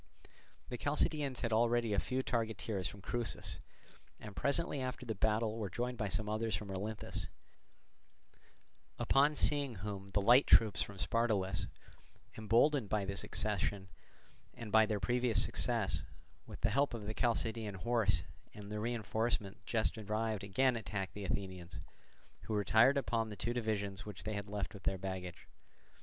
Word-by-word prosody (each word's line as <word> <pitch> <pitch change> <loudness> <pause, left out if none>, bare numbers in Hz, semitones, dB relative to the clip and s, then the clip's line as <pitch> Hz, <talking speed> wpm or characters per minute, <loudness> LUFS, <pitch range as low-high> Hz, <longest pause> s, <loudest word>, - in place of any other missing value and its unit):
The 125 - -5
Chalcidians 145 -2 0
had 115 -2 0
already 115 0 +2
a 100 - +3
few 130 0 -1
targeteers 110 -6 -2
from 100 - -10
Crusis, 120 -3 -3 0.6
and 105 -2 -9
presently 140 - +1
after 130 0 -4
the 115 - -2
battle 110 +2 0
were 105 -3 -2
joined 120 +5 -3
by 110 - 0
some 105 +3 0
others 110 0 -1
from 100 +1 -5
Olynthus; 105 +3 -3 1.7
upon 145 +2 +3
seeing 140 -5 +3
whom 100 0 -5
the 100 +1 0
light 120 +7 +6
troops 110 -4 +6
from 100 - -4
Spartolus, 105 -3 +1 0.7
emboldened 115 +3 +3
by 105 -1 0
this 100 0 -3
accession 100 -2 -1 0.7
and 115 -3 -7
by 110 0 +6
their 105 -2 -1
previous 120 +2 +2
success, - - +1 0.5
with - - -9
the 115 - +2
help 140 +1 +2
of 110 -3 -6
the 110 - -3
Chalcidian 115 -3 0
horse 100 -4 +2 0.3
and 105 0 -9
the 105 - -3
reinforcement 110 -2 -1
just 110 -1 0
arrived 110 0 -2
again 125 +6 +2
attacked 95 -3 -4
the 100 -1 -6
Athenians, 90 -4 -4 0.7
who 110 - -2
retired 110 +7 +5
upon 115 -5 0
the 105 - -6
two 120 +3 -2
divisions 105 -4 -2
which 105 -3 -8
they 110 - -3
had 100 -1 -4
left 105 -1 -3
with 100 - -10
their 95 - 0
baggage. 95 -2 -6
110 Hz, 155 wpm, -35 LUFS, 100-120 Hz, 1.7 s, light